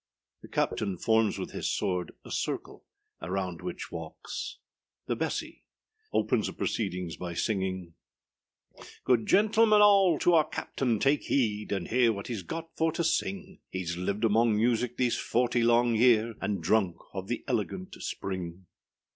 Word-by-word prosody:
The -, -, -11 dB
CAPTAIN 100 Hz, -4 st, -1 dB
forms 110 Hz, +2 st, +2 dB
with -, -, -5 dB
his -, -, -2 dB
sword 90 Hz, -3 st, -1 dB
a -, -, -10 dB
circle, -, -, -3 dB, 0.4 s
around 90 Hz, 0 st, -3 dB
which 180 Hz, 0 st, -6 dB
walks. -, -, -6 dB, 0.5 s
The -, -, -1 dB
BESSY -, -, -3 dB, 0.5 s
_opens -, -, +1 dB
the -, -, -5 dB
proceedings 90 Hz, -6 st, -2 dB
by 90 Hz, -1 st, -5 dB
singing_â 95 Hz, -3 st, -2 dB, 1.1 s
GOOD 120 Hz, -3 st, +2 dB
gentlemen 215 Hz, +1 st, +5 dB
all, 195 Hz, -5 st, +6 dB
to 175 Hz, -, +3 dB
our 155 Hz, -2 st, +4 dB
captain 120 Hz, -4 st, -1 dB
take 140 Hz, +6 st, +2 dB
heed, 105 Hz, -6 st, 0 dB
And 95 Hz, -3 st, -2 dB
hear 120 Hz, -1 st, +4 dB
what 100 Hz, -1 st, -6 dB
heâs 110 Hz, -6 st, -4 dB
got 165 Hz, -, -6 dB
for 160 Hz, 0 st, +1 dB
to 170 Hz, -, -1 dB
sing; 190 Hz, +3 st, -1 dB, 0.2 s
Heâs 85 Hz, -2 st, -2 dB
lived 100 Hz, +5 st, -2 dB
among 115 Hz, 0 st, +4 dB
music 120 Hz, +2 st, +1 dB
these 125 Hz, -2 st, +1 dB
forty 120 Hz, 0 st, +1 dB
long 120 Hz, 0 st, +4 dB
year, 115 Hz, 0 st, +4 dB
And 100 Hz, -2 st, -2 dB
drunk 100 Hz, -6 st, +2 dB, 0.2 s
of 95 Hz, 0 st, -5 dB
the 120 Hz, -, -3 dB
elegant 135 Hz, -, -2 dB
spring. 90 Hz, -1 st, -5 dB
115 Hz, 150 wpm, -29 LUFS, 95-135 Hz, 1.1 s, all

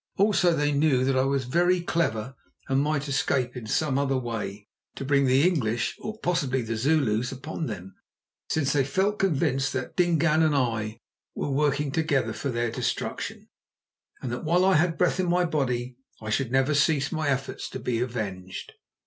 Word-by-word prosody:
Also 195 Hz, -3 st, +4 dB
they 145 Hz, -1 st, +1 dB
knew 140 Hz, -3 st, +2 dB
that 135 Hz, 0 st, +1 dB
I 130 Hz, 0 st, +3 dB
was 135 Hz, -1 st, 0 dB
very 175 Hz, +7 st, +2 dB
clever 135 Hz, -9 st, -1 dB, 0.3 s
and 135 Hz, 0 st, +2 dB
might 150 Hz, 0 st, 0 dB
escape 130 Hz, -2 st, 0 dB
in 120 Hz, -3 st, -7 dB
some 140 Hz, +4 st, +1 dB
other 135 Hz, -1 st, +1 dB
way 105 Hz, -4 st, -5 dB, 0.3 s
to 135 Hz, -, -5 dB
bring 140 Hz, 0 st, +3 dB
the 135 Hz, +6 st, +4 dB
English, 120 Hz, -10 st, 0 dB
or 215 Hz, 0 st, -6 dB
possibly 140 Hz, -8 st, 0 dB
the 115 Hz, 0 st, -3 dB
Zulus, 125 Hz, -3 st, +1 dB
upon 155 Hz, +4 st, -5 dB
them, 95 Hz, -3 st, -7 dB, 0.6 s
since 150 Hz, -4 st, +1 dB
they 140 Hz, -2 st, +3 dB
felt 190 Hz, +10 st, 0 dB
convinced 140 Hz, -7 st, +1 dB
that 130 Hz, -2 st, -4 dB
Dingaan 170 Hz, -3 st, +3 dB
and 155 Hz, -2 st, +3 dB
I 115 Hz, -4 st, -1 dB, 0.4 s
were 145 Hz, -, -2 dB
working 145 Hz, 0 st, +1 dB
together 135 Hz, -7 st, 0 dB
for 140 Hz, -, -3 dB
their 120 Hz, -1 st, -1 dB
destruction, -, -, -3 dB, 0.8 s
and 125 Hz, -, -3 dB
that 120 Hz, -, -4 dB
while 175 Hz, +3 st, +3 dB
I 190 Hz, -, +5 dB
had 165 Hz, +1 st, +2 dB
breath 180 Hz, +1 st, +2 dB
in 180 Hz, -2 st, +1 dB
my 180 Hz, +1 st, +3 dB
body 125 Hz, -6 st, -1 dB, 0.2 s
I 110 Hz, -1 st, -5 dB
should 120 Hz, +2 st, 0 dB
never 135 Hz, +3 st, +2 dB
cease 145 Hz, -1 st, +2 dB
my 155 Hz, -3 st, -1 dB
efforts 135 Hz, 0 st, -2 dB
to -, -, -6 dB
be 120 Hz, -2 st, -1 dB
avenged. 100 Hz, -7 st, -4 dB
135 Hz, 180 wpm, -26 LUFS, 120-160 Hz, 0.8 s, I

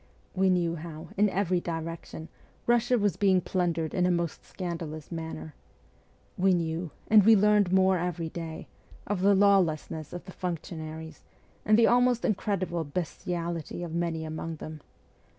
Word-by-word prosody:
We 190 Hz, 0 st, +2 dB
knew 170 Hz, -2 st, +1 dB
how, 160 Hz, -1 st, -8 dB
in 205 Hz, +1 st, +3 dB
every 185 Hz, -2 st, +1 dB
direction, 165 Hz, -1 st, -5 dB, 0.4 s
Bussia 240 Hz, +1 st, +3 dB
was 205 Hz, -4 st, +1 dB
being 190 Hz, -2 st, +4 dB
plundered 170 Hz, -3 st, -1 dB
in 180 Hz, -1 st, +2 dB
a -, -, +2 dB
most 170 Hz, -3 st, -1 dB
scandalous 165 Hz, -4 st, -6 dB
manner. 160 Hz, -2 st, -6 dB, 0.9 s
We 190 Hz, 0 st, +4 dB
knew, 165 Hz, 0 st, -2 dB, 0.2 s
and 215 Hz, -2 st, +7 dB
we 220 Hz, +2 st, +7 dB
learned 210 Hz, -2 st, +4 dB
more 190 Hz, -1 st, +4 dB
every 170 Hz, -2 st, -2 dB
day, 160 Hz, -1 st, -7 dB, 0.4 s
of 205 Hz, -2 st, -2 dB
the 200 Hz, +1 st, +5 dB
lawlessness 175 Hz, -6 st, +2 dB
of 175 Hz, -, -7 dB
the 190 Hz, -, -9 dB
functionaries, 160 Hz, -2 st, -6 dB, 0.4 s
and 215 Hz, 0 st, +5 dB
the 230 Hz, -, +6 dB
almost 245 Hz, 0 st, +3 dB
incredible 190 Hz, -6 st, -1 dB
bestiality 170 Hz, +1 st, -4 dB
of 170 Hz, -2 st, -6 dB
many 165 Hz, -2 st, -1 dB
among 160 Hz, +1 st, -5 dB
them. 155 Hz, 0 st, -8 dB
175 Hz, 150 wpm, -28 LUFS, 160-190 Hz, 0.9 s, and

